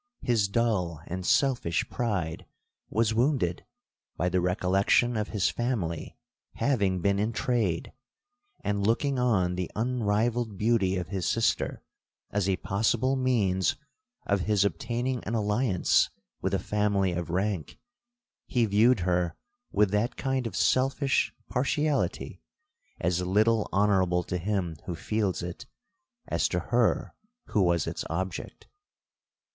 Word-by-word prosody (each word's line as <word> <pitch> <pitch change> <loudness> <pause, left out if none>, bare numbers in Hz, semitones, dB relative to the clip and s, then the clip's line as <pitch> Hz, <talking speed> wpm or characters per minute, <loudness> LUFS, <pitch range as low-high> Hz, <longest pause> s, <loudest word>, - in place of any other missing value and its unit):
His 115 -5 +2
dull 100 -7 0
and 90 +1 -5
selfish 125 - +2
pride 95 -9 -2 0.4
was 110 0 +1
wounded 120 - +1 0.5
by 90 +3 +1
the 90 0 +1
recollection 95 +6 +2
of 105 -1 -1
his 95 -4 0
family 100 -10 -3 0.4
having 100 -10 +1
been 100 +2 +2
in 110 +3 0
trade; 110 -10 -1 0.7
and, 100 -1 0
looking 125 +6 +1
on 100 -8 +2
the 90 -1 -3
unrivalled 115 -1 0
beauty 105 -3 +2
of 90 -1 -4
his 95 -3 -2
sister 115 -1 0 0.5
as 100 -1 0
a 95 - +3
possible 115 +8 +1
means 105 -8 +1 0.5
of 100 0 +1
his 100 -2 +3
obtaining 120 +2 -2
an 115 - -2
alliance 105 -2 +2 0.3
with - - 0
a - - +2
family 105 -3 +1
of 85 0 -3
rank, 95 -3 -2 0.7
he 120 -2 +2
viewed 110 +2 +4
her 90 -2 0 0.4
with 105 -1 +3
that 105 +4 0
kind 130 -3 -1
of - - -7
selfish 135 +2 +2 0.2
partiality 145 +3 -1 0.6
as 90 +1 0
little 105 +4 +2
honourable 95 -3 +2
to 90 +1 -3
him 90 -3 -1
who 90 - -3
feels 100 +1 -1
it, 90 -1 -7 0.6
as - - +1
to - - -2
her - - +1 0.4
who 105 - +2
was 85 -4 +2
its - - -4
object. 95 +3 -4
105 Hz, 130 wpm, -28 LUFS, 90-120 Hz, 0.7 s, viewed